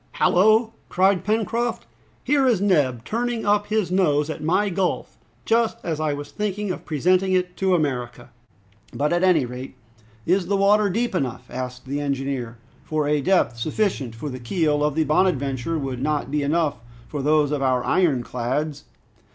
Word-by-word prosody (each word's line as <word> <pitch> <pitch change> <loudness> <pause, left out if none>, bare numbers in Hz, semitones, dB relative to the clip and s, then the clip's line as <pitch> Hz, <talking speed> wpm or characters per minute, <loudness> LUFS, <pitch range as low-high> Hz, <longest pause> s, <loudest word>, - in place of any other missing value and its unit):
"Hallo!" 220 +5 +3 0.2
cried 190 0 +2
Pencroft, 225 +2 -1 0.4
"here 280 -2 +2
is 235 -6 +3
Neb 145 - +1
turning 235 0 -2
up 205 0 +2
his 215 -4 0
nose 155 -5 +2
at 155 - -7
my 185 +6 +2
gulf, 190 -1 -2 0.3
just 230 0 +2
as 160 -3 -3
I 155 -1 0
was 145 0 -6
thinking 210 -1 -2
of - - -6
presenting 185 +5 +2
it 180 -1 0
to 190 -1 +2
America!" 125 -6 -3 0.6
"But, 150 +3 0
at 175 - +1
any 175 -7 +4
rate, 125 +2 -8 0.5
is 180 +1 +1
the 200 +1 +1
water 205 +1 +4
deep 230 +5 -1
enough?" 125 -7 -3
asked 125 +1 -6
the 140 +2 -3
engineer, 135 -4 -3 0.3
"for 155 -2 -1
a 150 0 +1
depth 135 -7 +2
sufficient 145 - -1
for 145 +6 -5
the 130 -1 -6
keel 150 +3 0
of 150 -1 0
the 160 - +2
'Bonadventure' 150 -2 0
would 135 -4 -4
not 145 -1 -1
be 150 0 0
enough 150 0 0 0.3
for 145 - -4
those 150 0 +2
of 145 -2 -1
our 130 -2 +1
iron 150 -9 +2
clads." 140 +6 -3
155 Hz, 170 wpm, -23 LUFS, 135-195 Hz, 0.6 s, any